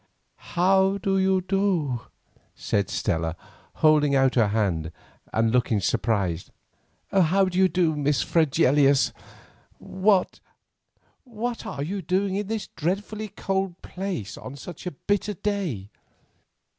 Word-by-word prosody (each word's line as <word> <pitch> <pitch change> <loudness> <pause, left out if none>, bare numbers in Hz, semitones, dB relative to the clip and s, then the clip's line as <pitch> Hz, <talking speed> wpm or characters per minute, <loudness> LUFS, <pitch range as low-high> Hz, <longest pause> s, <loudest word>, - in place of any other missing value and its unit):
"How 190 +2 +4
do 195 0 0
you 190 0 +2
do?" 185 - 0 0.5
said 100 -2 -1
Stella, 80 +1 -1 0.5
holding 150 -2 +5
out 135 -1 +3
her 115 -4 +3
hand, 95 -7 0 0.4
and 110 0 +2
looking 120 -3 +2
surprised. 100 -5 -1 0.6
"How 190 +1 +4
do 185 0 -1
you 190 - +6
do, 175 -4 +1
Miss 145 -6 +1
Fregelius? 140 - +3 0.6
What—what 215 +4 -3
are 140 - -4
you 190 +6 -3
doing 190 +3 0
in 205 0 -2
this 220 -1 -3
dreadfully 205 +6 -3
cold 195 -2 -3
place 180 - -5
on 130 - -8
such 175 +5 -9
a - - -2
bitter 205 +7 -1
day?" 175 - -3
175 Hz, 120 wpm, -25 LUFS, 125-195 Hz, 0.6 s, you